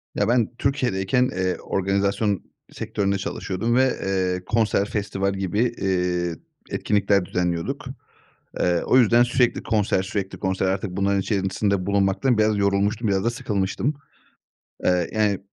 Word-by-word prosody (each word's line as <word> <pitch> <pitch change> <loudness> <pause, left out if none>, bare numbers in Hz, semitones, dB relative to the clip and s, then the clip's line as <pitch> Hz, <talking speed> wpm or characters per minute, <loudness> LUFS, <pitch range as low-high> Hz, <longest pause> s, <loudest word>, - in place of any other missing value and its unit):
Ya, - - +1
ben 120 0 +1
Türkiye'deyken, 125 -3 +1
eee, 95 0 0
organizasyon 100 +1 0 0.3
sektöründe 100 -3 -1
çalışıyordum 100 +4 -2
ve, 130 0 +3
eee, 90 -1 -1
konser, 110 -3 +1
festival 100 -2 -2
gibi, 95 +1 -2
eee, 90 -7 0 0.3
etkinlikler 100 -2 +1
düzenliyorduk. 85 -2 -2 0.7
Eee, 90 -1 +2
o - - +4
yüzden 120 -1 +5
sürekli 125 0 +1
konser, 105 -4 +1
sürekli 95 0 -4
konser, 95 0 -1
artık 95 +1 -1
bunların 100 +1 +1
içerisinde 95 -1 0
bulunmaktan 100 +5 +2
biraz 110 -1 +2
yorulmuştum; 100 +3 +1
biraz 95 -1 +1
da - - +3
sıkılmıştım. 105 +3 -1 0.9
Eee, 90 -2 +2
yani, 105 -3 +1
100 Hz, 130 wpm, -23 LUFS, 95-110 Hz, 0.9 s, yüzden